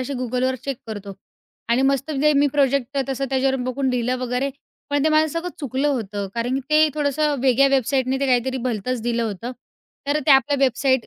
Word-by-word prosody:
अशी 255 +2 -4
Googleवर 255 +1 0
चेक 275 -2 -3
करतो 205 -2 -7 0.6
आणि 240 +3 +2
मस्त 275 +2 +1
म्हणजे 300 +1 +2
मी 290 - +4
प्रोजेक्ट 275 -1 +1
तसं 270 0 -2
त्याच्यावर 265 0 +1
बघून 260 +2 -1
लिहिलं 250 +1 0
वगैरे, 255 +2 -1 0.4
पण 285 0 +1
ते - - +4
मला 310 0 +4
सगळं 335 +4 -3
चुकलं 275 0 -1
होतं. 210 -7 -2
कारण 240 +2 -1
की 270 - 0
ते 310 0 +5
थोडंसं 295 0 0
वेगळ्या 270 +1 +4
वेबसाईटने 265 0 +1
ते 275 - +1
काहीतरी 260 0 +1
भलतंच 240 +2 -2
दिलं 235 0 0
होतं. 225 +3 -4 0.6
तर 295 +1 +2
त्या 285 - +8
आपल्या 285 +1 0
वेबसाईट 260 0 +1
265 Hz, 190 wpm, -22 LUFS, 245-280 Hz, 0.6 s, त्या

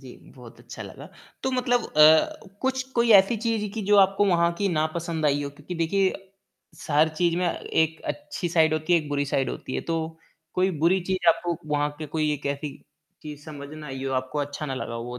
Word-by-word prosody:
जी, - - -12 0.2
बहुत - - -13
अच्छा - - -9
लगा। - - -10 0.3
तो 265 - 0
मतलब 245 -1 +1
अ, 155 - +6 0.2
कुछ 260 0 0
कोई 235 -1 +2
ऐसी 195 +3 +6
चीज़ 220 -1 -1
की 220 - -3
जो 205 - +5
आपको 195 +1 +4
वहाँ 170 -1 +3
की 200 - +1
ना 155 -3 +1
पसंद 165 -2 -2
आई 145 0 +2
हो 140 - -4
क्योंकि 150 +5 -9
देखिए 185 +3 +1 0.6
स - - -12
हर 150 +2 +4
चीज़ 170 +1 +1
में 180 0 +1
एक 160 -1 -1
अच्छी 295 -11 -4
साइड 160 -2 +3
होती 155 +2 0
है 170 - +6
एक 150 -2 -7
बुरी 145 0 0
साइड 135 -1 0
होती 130 - -6
है - - -1
तो 165 - +1 0.6
कोई 185 +1 +2
बुरी 175 +5 +3
चीज़ 185 -2 0
आपको 170 +1 +2 0.2
वहाँ 145 0 +1
के 155 - -5
कोई 155 0 0
एक 145 -1 -4
ऐसी 140 +1 -3 0.5
चीज़ 150 -2 -9
समझ 145 -3 -8
ना 155 -1 -9
आई 135 -1 -6
हो 135 - -2
आपको 130 +3 -2
अच्छा 145 +1 -3
ना 135 - -3
लगा 130 -2 -5
हो 115 - -4
वो 125 0 -6
160 Hz, 225 wpm, -25 LUFS, 145-190 Hz, 0.6 s, अ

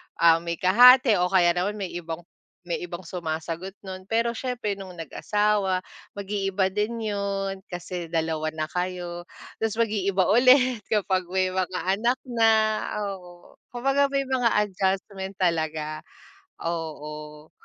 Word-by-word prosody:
ah, 165 -1 +5
may 170 0 -3
kahati 235 - +7
o 180 - +3
kaya 180 -2 +4
naman 180 +4 -1
may 195 -4 -5
ibang 165 0 -6 0.4
may 175 -1 -2
ibang 175 0 -6
sumasagot 170 +2 -5
nun. 185 -1 -8
Pero 230 +2 +1
siyempre 235 -4 -3
nung 190 -2 -9
nag-asawa 195 +3 0 0.3
mag-iiba 195 -1 -1
din 215 +2 -2
'yon 195 -1 -2
kasi 175 -1 -6
2 160 -1 -1
na 155 -1 -3
kayo, 180 -1 -4 0.3
'tas 220 -1 -1
mag-iiba 200 -4 +1
ulit 255 +1 +5
kapag 190 -4 0
may 185 +1 +1
mga 185 -1 -2
anak 235 +6 +2
na, 230 -3 +2 0.5
oo. 180 -3 -9
Kumbaga 275 +3 +1
may 275 0 0
mga 255 -2 +2 0.2
adjustment 195 0 -2
talaga, 155 -3 0 0.6
oo. 150 -2 -6
190 Hz, 130 wpm, -25 LUFS, 175-210 Hz, 0.6 s, kahati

